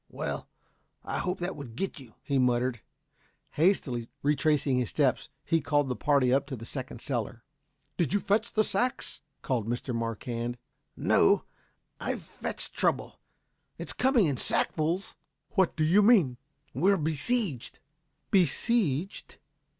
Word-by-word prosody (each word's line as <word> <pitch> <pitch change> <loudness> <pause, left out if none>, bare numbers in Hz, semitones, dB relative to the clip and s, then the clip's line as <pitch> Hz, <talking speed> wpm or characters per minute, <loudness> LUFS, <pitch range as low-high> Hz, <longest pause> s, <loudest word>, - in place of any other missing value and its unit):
"Well; - - -5 0.6
I - - -2
hope 180 +1 -2
that 175 +2 -2
would 130 -6 -9
get 190 +1 -3
you," 125 -5 -14
he 140 -2 0
muttered. 125 -2 +1 0.7
Hastily 140 - +1
retracing 145 -2 +2
his 125 - -1
steps - - +1 0.2
he 165 -1 +2
called 145 -1 +1
the 125 - -1
party 135 -3 +2
up 140 +1 +2
to 135 - -4
the 115 -1 -9
second 130 -2 -6
cellar. 120 -2 -3 0.5
"Did 170 -5 +1
you 205 - +2
fetch 210 +3 0
the 215 - +3
sacks?" 250 +6 -1 0.2
called 120 -5 -1
Mr. 120 +2 -3
Marquand. 115 +1 -3 0.4
"No, 405 -1 +3 0.5
but - - -9
I've - - -2
fetched - - -4
trouble. - - 0 0.6
It's - - -4
coming 255 -5 +3
in 140 -5 0
sackfuls." 165 +9 +1 0.4
"What 190 -5 +2
do 155 - 0
you 175 +7 +5
mean?" 195 - +5 0.4
"We're 195 +5 +3
besieged." 160 - 0 0.5
"Besieged?" 190 - +1
145 Hz, 140 wpm, -29 LUFS, 125-195 Hz, 0.7 s, you